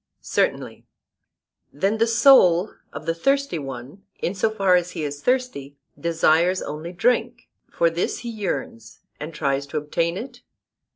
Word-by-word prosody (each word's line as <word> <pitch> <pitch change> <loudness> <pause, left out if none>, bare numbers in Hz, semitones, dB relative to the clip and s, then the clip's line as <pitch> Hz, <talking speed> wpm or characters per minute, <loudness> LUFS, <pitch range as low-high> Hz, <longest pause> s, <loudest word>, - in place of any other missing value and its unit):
Certainly. - - -1 0.9
Then 195 +9 -1
the 230 - +3
soul 225 -7 +5 0.2
of - - -8
the 165 - 0
thirsty 275 - 0
one, 135 +6 -8 0.2
in 175 - -2
so 200 +3 +1
far 195 -4 +2
as 180 -1 +2
he 155 - -4
is 145 -1 -5
thirsty, 250 - -1 0.2
desires 170 +2 +2
only 155 +3 -6
drink; 240 +5 0 0.2
for 170 - +2
this 165 +2 -1
he 240 - -5
yearns 135 - -5 0.2
and 150 +2 -6
tries 140 -2 -1
to 140 - -4
obtain 165 +3 -1
it? 245 +2 -8
175 Hz, 150 wpm, -23 LUFS, 150-225 Hz, 0.9 s, soul